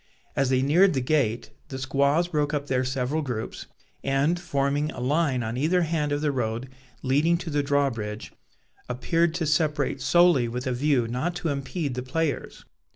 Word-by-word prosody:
As 135 -1 +1
they 130 0 +2
neared 170 +5 +4
the - - +2
gate, 125 -4 0 0.2
the 135 - -6
squaws 140 +5 +1
broke 150 -2 0
up 145 -1 -2
their 130 -2 0
several 130 +4 -1
groups, 125 -6 -5 0.4
and, 140 +6 +1
forming 145 -3 0
a - - -8
line 135 -1 +1
on 110 +2 -3
either 170 +6 +2
hand 155 -2 -1
of 145 0 0
the 150 -1 +1
road 120 -1 -2 0.3
leading 150 +6 +3
to 170 -2 -6
the 145 0 +1
drawbridge, 135 -7 -1 0.6
appeared 165 +7 +1
to 165 - -1
separate 150 -2 0
solely 155 -2 +4
with 125 +2 -4
a 130 - 0
view 130 -2 +1
not 130 +9 -2
to 175 -2 -2
impede 140 +1 -3
the 125 - -3
players. 145 +3 -3
140 Hz, 175 wpm, -26 LUFS, 130-155 Hz, 0.6 s, neared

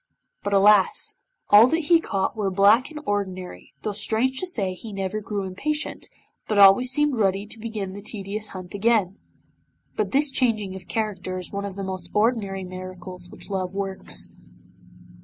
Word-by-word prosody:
But 205 - -3
alas! 200 0 +4 0.3
all 210 +3 +9
that 325 +6 +1
he 330 +2 +4
caught 195 -10 -2
were 210 -3 -1
black 205 +7 +4
and 310 -1 -8
ordinary, 190 -4 -4
though 215 - -1
strange 225 +5 0
to 370 - 0
say 200 - -2
he 215 +4 -9
never 195 +1 -3
grew 205 -2 -3
impatient, 295 +12 -3 0.4
but 215 - 0
always 200 +5 +7
seemed 295 -1 +1
ready 195 -1 +1
to 220 +2 -8
begin 215 -4 -5
the 205 - -8
tedious 210 0 -4
hunt 185 -1 -9
again. 205 -2 +1 0.8
But - - -1
this 280 +1 +4
changing 215 -7 +1
of 185 -2 -10
character 185 -2 -3
is 180 - -7
one 200 0 -3
of 195 -2 -6
the 195 - -5
most 190 -1 -5
ordinary 210 -3 +1
miracles 185 -1 -8
which - - -9
love 190 -1 -3
works. 190 - -3
200 Hz, 170 wpm, -24 LUFS, 190-225 Hz, 0.8 s, all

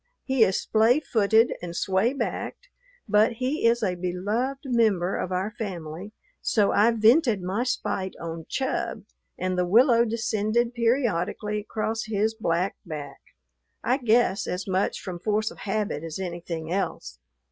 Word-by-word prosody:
He 265 -4 +3
is 190 -3 +2
splay 225 +5 +3
footed 225 -4 +3
and 170 -1 -6
sway 190 +6 +1
backed, 385 - -4 0.4
but 215 +2 +4
he 255 +2 0
is 235 0 +2
a 185 -3 +1
beloved 205 +10 -2
member 215 -8 +2
of 185 - -3
our 185 +3 -1
family, 185 -4 -6 0.3
so 210 -3 +2
I 215 +3 +4
vented 230 - +4
my 195 +6 -1
spite 190 -6 -2
on 165 -1 -6
Chub, 265 -1 -2 0.3
and 185 0 -1
the 180 - +1
willow 235 +4 +5
descended 230 +1 0
periodically 225 -4 0
across 220 +1 -3
his 215 0 0
black 185 -3 -1
back, 150 -4 -7 0.6
I 255 - +2
guess 235 -5 +2
as 180 +2 -3
much 190 +1 0
from 180 -2 -6
force 215 +3 0
of - - -14
habit 205 -6 -2
as 165 -2 -5
anything 170 -3 -5
else. 65 - -3
210 Hz, 145 wpm, -26 LUFS, 180-230 Hz, 0.6 s, willow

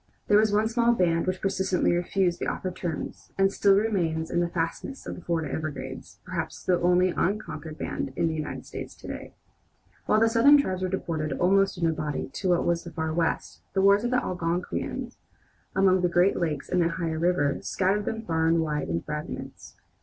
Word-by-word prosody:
There 205 - +6
was 215 -1 +3
one 210 +1 +3
small 235 +1 +3
band 170 -5 +1
which 185 0 -1
persistently 190 -1 +1
refused 175 0 0
the - - -2
offered 185 -1 -3
terms, 175 -3 -5
and 195 0 +3
still 200 -1 +4
remains 175 -7 0
in 175 - +1
the 175 0 +1
fastnesses 170 +11 -3
of - - -4
the - - -9
Florida 165 -3 -2
Everglades, 140 -4 -5
perhaps - - -4
the 180 -1 +2
only 180 +1 +4
unconquered 170 -5 -2
band 135 - -3
in 165 - +1
the 160 - -1
United 155 -1 -5
States - - -7
to - - -12
day. - - -7 0.7
While 215 - +4
the 225 - +5
Southern 235 +6 +6
tribes 185 -9 -1
were 185 - 0
deported 160 -5 -2
almost 195 +5 +2
in 170 - 0
a 165 - +2
body 150 -3 -3
to 190 - -2
what 175 -1 +2
was 170 -1 +1
then 170 - -7
the - - -26
far 160 -1 -1
West, 165 0 -1
the 190 - +2
wars 200 +2 +5
of 240 - 0
the 255 0 +1
Algonquins, 175 0 -3 0.6
along 190 -1 +4
the 180 - +2
Great 175 +3 +3
Lakes 155 -5 -2
and 180 - +1
the 165 - +3
Ohio 165 -2 -2
River, 160 -5 +1
scattered 200 +2 0
them 225 0 -3
far 160 -5 0
and 165 0 +3
wide 150 - -2
in 85 +1 -1
fragments. 150 0 -7
180 Hz, 205 wpm, -27 LUFS, 160-195 Hz, 0.7 s, There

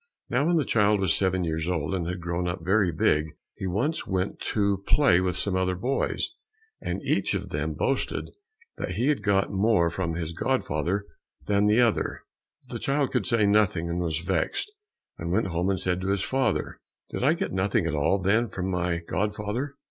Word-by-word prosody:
Now 135 +5 +2
when 175 - +3
the 155 -4 +2
child 105 -2 +3
was 95 -4 +2
seven 95 -1 +1
years 80 -1 -2
old 80 -1 -1
and 85 -3 -1
had 90 +1 -3
grown 85 +1 -2 0.2
very 95 0 +3
big, 75 0 +1 0.2
he 95 - -5
once 120 - -1
went 95 0 -1
to 100 -2 0
play 95 -12 +5
with 90 -2 0
some 95 +1 -1
other 95 0 +1
boys, 125 +9 -1 0.5
and - - -3
each - - +1
of - - -4
them - - -2
boasted - - -1 0.5
that 90 - -3
he 120 +9 +1
had 145 -7 +1
got 100 -1 +2
more 95 -4 +3
from 85 -2 -2
his 85 -1 -3
godfather 85 +5 -1 0.4
than 100 0 +2
the 110 +4 +5
other; 115 -3 +1 0.4
but - - -13
the - - -3
child 140 0 0
could - - 0
say 115 -3 +3
nothing, 100 -5 +2
and 85 - -1
was 80 -3 -1
vexed, 395 - -1 0.5
and 85 +1 -3
went 95 - +1
home 85 +2 0
and 95 -2 0
said 90 +1 -1
to 95 - -3
his 100 -1 +1
father, 135 0 -1 0.3
"Did - - -3
I 145 +4 +5
get 180 +3 -3
nothing 95 -1 +1
at 85 - -1
all, 75 +6 +2
then, 105 +5 +2
from 95 0 -3
my 90 -1 -1
godfather?" 105 - -2
95 Hz, 195 wpm, -26 LUFS, 85-105 Hz, 0.5 s, play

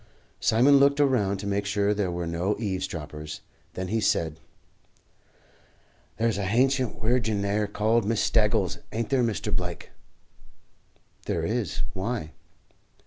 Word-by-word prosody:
Simon 130 +6 +5
looked 140 +1 +4
around 120 -9 +2
to 100 - -7
make 100 0 0
sure 100 0 +1
there 100 -3 -1
were 85 0 -3
no 85 +5 -1
eavesdroppers; 80 -7 -4 0.3
then 95 0 -4
he 110 +2 0
said, 80 -5 0 1.8
"There's 115 -2 +1
a 100 - -1
hancient 130 +4 +1
wirgin 110 -3 +1
'ere 105 +1 0
called 110 +3 +1
Miss 110 +2 0
Staggles, 105 -2 +2
ain't 115 0 -2
there, 135 -2 +3
Mr. 115 -5 -1
Blake?" - - -4 1.4
"There - - -1
is. - - -1
Why?" 95 -4 -3
105 Hz, 130 wpm, -26 LUFS, 95-115 Hz, 1.8 s, Simon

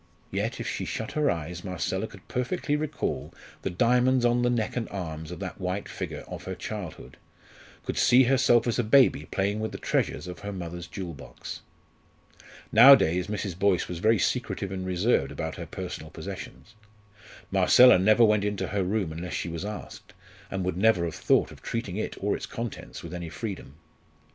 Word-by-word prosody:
Yet, - - -2
if - - -4
she - - -3
shut 110 - -4
her 150 -1 +1
eyes, 85 +2 -3
Marcella 90 -5 -2
could - - -15
perfectly 145 +4 -1
recall 150 -1 -3 0.3
the - - -2
diamonds 125 +6 +3
on 120 0 +3
the 120 - +2
neck 115 -3 -1
and 120 -2 -2
arms 80 -5 -5
of 90 - -6
that 95 0 -6
white 90 +2 -2
figure - - -6
of - - -8
her 95 - -4
childhood 90 - -7 0.7
could - - -2
see 125 +2 +6
herself 130 -2 +4
as 120 0 0
a - - +3
baby 115 - +4
playing 100 +2 0
with 110 0 -2
the - - -6
treasures - - -1
of 90 -2 -7
her 100 - -5
mother's 85 -2 -6
jewel 85 -1 -6
box. 65 -4 -9 1.1
Nowadays, 110 - +7
Mrs. 100 -4 -4
Boyce 100 -3 +2
was 90 -2 -5
very 110 +4 +4
secretive 100 -4 -1
and 95 -1 -4
reserved 90 - +1
about - - -4
her - - -6
personal 80 - -6
possessions. 110 - -9 0.8
Marcella 95 +4 +7
never 110 +5 +5
went 105 -2 +3
into 105 -1 -2
her 100 -1 0
room 95 -2 -1
unless 85 +3 -6
she 90 - -2
was 85 +1 -5
asked, 105 0 -8 0.4
and 95 -1 -3
would 90 -2 -2
never 95 -4 +3
have 85 - -4
thought - - +2
of - - -13
treating 105 -5 -4
it 110 - -3
or 100 +1 0
its - - -6
contents 115 -1 -6
with - - -8
any 85 -2 -5
freedom. 95 - -6
100 Hz, 185 wpm, -27 LUFS, 90-115 Hz, 1.1 s, Nowadays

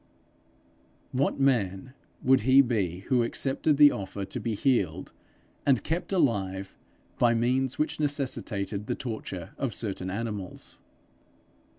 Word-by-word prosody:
What 135 +2 0
man 125 -3 +1 0.3
would 130 0 +5
he 135 +3 +6
be 95 -8 -1
who 125 +4 +2
accepted 135 +5 0
the 145 -1 +8
offer 100 0 -5
to - - -5
be 115 -2 -2
healed 95 - 0 0.5
and 135 -4 +3
kept 170 +5 -2
alive 100 - 0 0.4
by 120 -1 +4
means 130 +3 +1
which 150 - -1
necessitated 120 -8 -2
the - - -1
torture 110 -8 -6
of 130 -6 -1
certain 95 -4 -3
animals? 105 -2 -5
115 Hz, 120 wpm, -28 LUFS, 100-135 Hz, 0.5 s, the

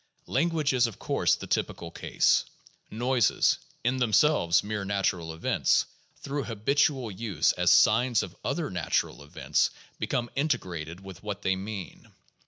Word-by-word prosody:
Language 155 0 +1
is, 125 -2 +3
of 115 - -9
course, - - +1
the - - -8
typical 85 -1 -2
case. - - +2 0.5
Noises, 120 -1 +2 0.2
in 125 +3 +1
themselves 110 - +3
mere 105 -1 -3
natural 95 -4 -1
events, 80 +1 +1 0.3
through 140 0 -4
habitual 125 +2 +1
use 105 0 +1
as - - +1
signs 125 -2 +4
of - - -9
other - - -2
natural - - -1
events 75 - 0 0.3
become 120 -1 -2
integrated 90 - -2
with 95 -1 -10
what 105 -1 -5
they 95 - +2
mean. 100 0 -7
110 Hz, 135 wpm, -27 LUFS, 95-130 Hz, 0.5 s, signs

